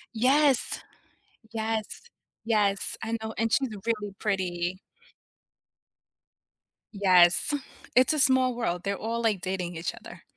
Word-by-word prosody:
Yes! 270 +3 +2 0.7
Yes. 220 - -3 0.4
Yes, 205 -3 +1
I 225 +1 -2
know, 220 0 -5
and 225 0 0
she's 270 -2 +1 0.2
really 210 -3 -2
pretty. 185 -3 -2 2.1
Yes. 185 - +4 0.4
It's 255 +5 +5
a 305 - 0
small 260 -2 +4
world, 180 -7 -2
they're 200 0 -2
all, 230 +1 -3
like, 215 -5 0
dating 185 -2 -4
each 165 +1 -4
other. - - -13
220 Hz, 115 wpm, -27 LUFS, 185-235 Hz, 2.1 s, It's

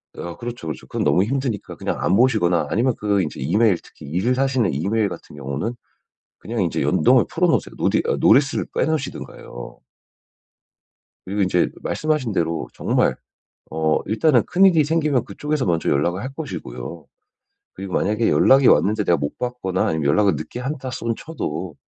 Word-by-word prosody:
아 85 0 -7
그렇죠, 120 -7 -7
그렇죠. 75 - -6
그건 - - -2
너무 90 - +3
힘드니까 125 -1 -3
그냥 - - -3
안 95 - +2
보시거나 110 -8 +2
아니면 125 +4 +1
그 100 -2 +1
인제 75 - -5
이메일 95 - +2
특히 - - -15
일을 95 - 0
하시는 130 -7 +1
이메일 100 +9 0
같은 90 - -10
경우는 70 - -4 0.6
그냥 115 -2 -3
인제 85 - -1
연동을 - - +4
풀어놓으세요. - - 0
노디 - - +1
아 - - +1
노티스를 135 +5 +4
빼놓으시든가요. 150 - -4 1.5
그리고 100 +2 -2
인제 90 -2 +2
말씀하신 150 -6 -1
대로 85 -2 -1
정말 - - +1 0.6
어 80 -1 +1
일단은 120 +3 +3
큰일이 180 -4 +4
생기면 150 -4 +1
그쪽에서 150 +7 -2
먼저 85 -3 0
연락을 85 +7 0
할 130 - -4
것이고요. 85 - -7 0.7
그리고 95 -1 -7
만약에 110 +3 +1
연락이 135 0 +5
왔는데 105 0 +4
내가 85 - +3
못 70 -2 -4
받거나 120 -7 -2
아니면 80 -2 -1
연락을 95 +6 +3
늦게 120 - -6
한다손 130 -3 -3
쳐도 90 - -5
105 Hz, 385 characters per minute, -21 LUFS, 85-130 Hz, 1.5 s, 연락이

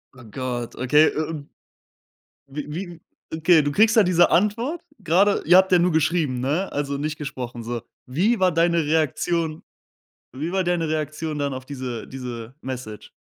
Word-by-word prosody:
Oh 130 - -14
Gott, 125 -3 -4
okay, 150 +5 +4
äh - - -2
un 155 -2 -4 1.0
Wie 150 +2 -7
wie 175 -2 -6 0.3
Okay, 160 0 +4
du 145 - -1
kriegst 220 +7 +4
da 220 - +8
diese 180 -2 +4
Antwort 230 - +1 0.2
gerade, 195 +5 +2
ihr 180 +2 +7
habt 190 0 +5
ja 180 - +5
nur 175 0 +2
geschrieben, 155 -4 +1
ne? 150 +9 -1
Also 140 -1 -2
nicht 150 +1 -3
gesprochen, 125 -5 -6
so. 120 +1 -4 0.3
Wie 190 - +1
war 185 -1 +4
deine 170 0 +2
Reaktion? 160 +1 0 0.7
Wie 145 +6 -4
war 190 0 0
deine 175 -2 0
Reaktion 155 0 -3
dann 140 -1 -1
auf 130 0 -7
diese 130 -5 -6
diese 125 -2 -7
Message? 125 -5 -7
155 Hz, 170 wpm, -23 LUFS, 130-175 Hz, 1.0 s, da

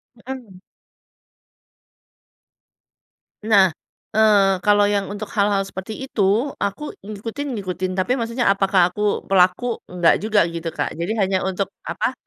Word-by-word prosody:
Mhm. 235 -6 -9 2.8
Nah. 200 -5 +4 0.4
Eee, 200 -3 +4
kalo 205 0 +4
yang 205 -1 0
untuk 205 +1 -5
hal-hal 200 -2 +2
seperti 195 +7 -7
itu, 220 +3 +1
aku 200 +10 -3
ngikutin-ngikutin 205 -4 -4
tapi 190 +7 +1
maksudnya 235 0 -1
apakah 195 -2 +3
aku 210 0 -1
pelaku? 190 +5 +2
Enggak 175 -2 +2
juga 210 -3 +3
gitu, 170 0 -4
Kak. - - -3
Jadi, 175 +8 -3
hanya 190 -2 +1
untuk 190 +1 -2
apa? - - -2
200 Hz, 115 wpm, -21 LUFS, 190-220 Hz, 2.8 s, Nah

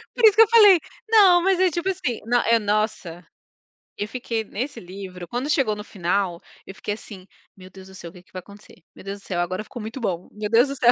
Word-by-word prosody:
Por 480 - -4
isso 425 -2 +7
que 445 - +7
eu - - 0
falei 420 -5 +7 0.3
não, 390 -6 +6
mas 385 -1 +2
é 370 -1 +3
tipo 345 +4 -2
assim, 255 -10 -3
no 245 +2 +2
é, 230 0 +4
nossa. 210 -5 -2 0.7
Eu 205 - -3
fiquei 230 -2 -4
nesse 235 +4 -6
livro, 185 -1 -9
quando 250 - -4
chegou 265 -8 +1
no 210 - -8
final, 180 -2 -2 0.3
eu 195 - -10
fiquei 205 - -4
assim, 205 -3 -11 0.3
"meu 185 -1 -13
Deus 190 0 -14
do 190 - -14
céu, 170 -4 -10
que 180 - -14
que - - -30
vai 185 - -7
acontecer? 205 +3 -16 0.2
Meu - - -13
Deus 200 +1 -6
do - - -22
céu, 175 -2 -2
agora 185 +4 -3
ficou 240 +2 -10
muito 225 +5 -7
bom, 180 -7 -3
meu 210 0 -5
Deus 235 +4 +4
do 275 - -4
céu". 245 -3 +4
215 Hz, 240 wpm, -23 LUFS, 190-270 Hz, 0.7 s, isso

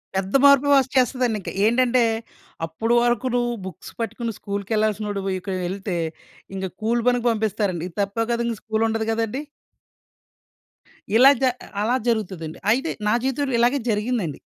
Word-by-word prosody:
పెద్ద 190 +1 -2
మార్పులు 280 0 +6
వచ్చేస్తదండి. 255 -3 +1
ఇంక - - -6 0.2
ఏంటంటే, 245 +2 +3 0.6
అప్పుడు 220 +9 -1
వరుకు 240 +1 +1
నువ్వు 240 0 +1
బుక్స్ 185 -4 -9
పట్టుకొని 230 +1 -3
స్కూల్‌కెళ్ళాల్సినోడివికెళ్తే 200 -3 -2 0.6
ఇంక 190 0 -3 0.2
కూలి 230 +2 +1
పనికి 245 -1 +2
పంపిస్తారండి. 210 -5 -1
ఇది 170 - -21
తప్పే 200 +3 -1
కదా, 235 0 0
ఇంకా 230 -2 -2
స్కూలుండదు 220 0 -1
గదండీ. 225 +4 -1 1.8
ఇలా 260 +3 +8
జ - - 0 0.4
అలా 230 +4 +2
జరుగుతదండి. 190 -9 -2
అయితే 265 +8 +1 0.2
నా 210 - +3
జీవితంలో 270 +1 -1
ఇలాగే 245 +4 +3
జరిగిందండి. 210 - -1
225 Hz, 125 wpm, -23 LUFS, 200-245 Hz, 1.8 s, ఇలా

